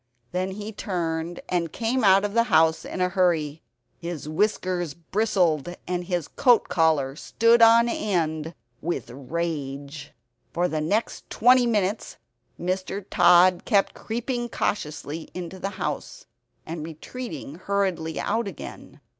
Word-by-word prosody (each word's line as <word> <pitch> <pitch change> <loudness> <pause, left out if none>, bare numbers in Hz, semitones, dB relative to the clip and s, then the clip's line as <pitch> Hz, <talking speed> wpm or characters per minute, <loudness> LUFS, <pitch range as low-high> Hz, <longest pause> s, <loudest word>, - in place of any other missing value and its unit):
Then 185 +1 -1
he 210 +2 -6
turned 170 -4 -3
and 170 -3 -1
came 235 +2 -1
out 195 0 +6
of 205 - -3
the 230 0 +3
house 160 -6 +3
in 185 - -4
a 180 - +2
hurry. 165 -5 +1 0.4
His 170 -3 -6
whiskers 175 -2 0
bristled 175 -3 0
and 180 0 -2
his 175 -3 -2
coat 245 -3 +3
collar 155 -5 +2
stood 230 +8 +3
on 230 +1 +7
end 165 -8 -1 0.3
with 170 -7 -3
rage. 145 0 -5 0.4
For 175 +1 +1
the 155 -3 -2
next 205 +9 -1
twenty 250 +1 +5
minutes 210 -2 -1 0.4
Mr. 185 +2 -3
Tod 175 +1 +6
kept 200 -4 +2
creeping 240 +1 -3
cautiously 155 -6 -3
into 180 +1 -6
the 195 - -2
house, 185 - -4 0.4
and 160 -1 -5
retreating 165 - -7
hurriedly 190 -5 -1
out 230 -1 -1
again. 155 -4 -9
180 Hz, 130 wpm, -25 LUFS, 160-205 Hz, 0.4 s, on